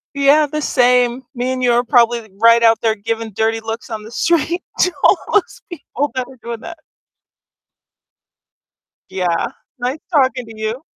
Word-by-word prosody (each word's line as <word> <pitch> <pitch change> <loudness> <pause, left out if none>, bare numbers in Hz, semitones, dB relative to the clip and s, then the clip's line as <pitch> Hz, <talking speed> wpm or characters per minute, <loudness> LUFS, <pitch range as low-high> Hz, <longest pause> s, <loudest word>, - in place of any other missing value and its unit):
Yeah, 280 +2 +4
the 305 +1 -4
same, 250 -1 +2
me 250 +1 -1
and 255 0 -4
you 245 - +3
are 240 +1 +2
probably 235 -2 +2
right 230 0 +6
out 225 -1 +4
there 220 -1 +1
giving 225 +1 -4
dirty 225 +2 -1
looks 225 +2 -6
on 220 -1 -5
the 220 - -11
street 340 +6 0 0.2
to 365 - +3
all - - +6 0.2
those 415 -3 0
people 290 -2 -4
that 255 -1 -2
are 265 - -15
doing 235 -1 -5
that. 335 +3 -9 2.3
Yeah, 180 -3 -1 0.3
nice 255 +5 -2
talking 260 -5 +2
to 225 -1 -12
you. 220 +4 -3
245 Hz, 165 wpm, -18 LUFS, 225-275 Hz, 2.3 s, right